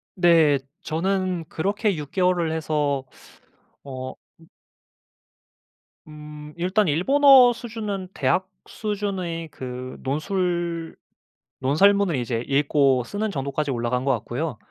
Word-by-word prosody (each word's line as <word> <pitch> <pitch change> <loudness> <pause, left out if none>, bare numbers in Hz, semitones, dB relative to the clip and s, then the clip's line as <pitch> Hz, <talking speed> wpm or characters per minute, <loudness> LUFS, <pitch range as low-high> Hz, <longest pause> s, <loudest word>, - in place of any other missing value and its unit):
네. 165 -5 +5 0.2
저는 185 +1 -1
그렇게 200 +3 -1
6 150 -2 -7
개월을 180 -3 +1
해서 150 -4 -1 0.8
어 130 -1 -6 0.3
음 165 - -18 1.6
음. 150 0 -10
일단 185 +3 +1
일본어 260 - +6
수준은 215 -5 -5
대학 150 +7 +1 0.2
수준의 195 -6 -4
그 130 -2 -7
논술 170 +3 -2 0.6
논설문을 190 +6 +3
이제 120 -2 -2
읽고 140 -2 +3
쓰는 205 - -3
정도까지 140 +1 -2
올라간 120 +1 -1
것 140 - +3
같고요. 125 +4 -3
165 Hz, 210 characters per minute, -24 LUFS, 140-190 Hz, 1.6 s, 일본어